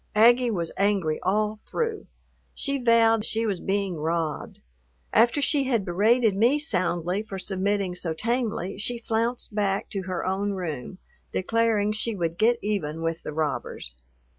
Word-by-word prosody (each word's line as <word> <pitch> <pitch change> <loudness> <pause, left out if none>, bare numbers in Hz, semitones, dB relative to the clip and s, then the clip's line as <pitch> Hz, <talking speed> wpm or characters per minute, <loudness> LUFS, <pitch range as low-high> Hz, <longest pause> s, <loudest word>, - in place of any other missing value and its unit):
Aggie 240 +3 +6
was 170 -7 -2
angry 195 -6 +1
all 210 +3 0
through. 450 - -3 0.5
She 275 -1 -1
vowed 225 -2 +4
she 225 +1 0
was 200 -5 -1
being 195 -3 -1
robbed. 160 0 -2 0.6
After 240 +5 +4
she 280 -2 +2
had 235 -7 +1
berated 215 +4 +3
me 235 +8 +4
soundly 180 - 0
for 210 -3 -7
submitting 195 0 -1
so 180 -2 -3
tamely, 215 0 -2
she 240 +3 -1
flounced 230 0 -2
back 200 -2 -1
to 195 - -2
her 180 -2 -2
own 195 +2 -1
room, 175 -4 -5 0.3
declaring 220 0 +1
she 215 +1 -1
would 170 -2 -2
get 235 +2 +4
even 165 -7 -2
with 165 0 -2
the - - -6
robbers. 150 - -3
205 Hz, 150 wpm, -26 LUFS, 180-230 Hz, 0.6 s, Aggie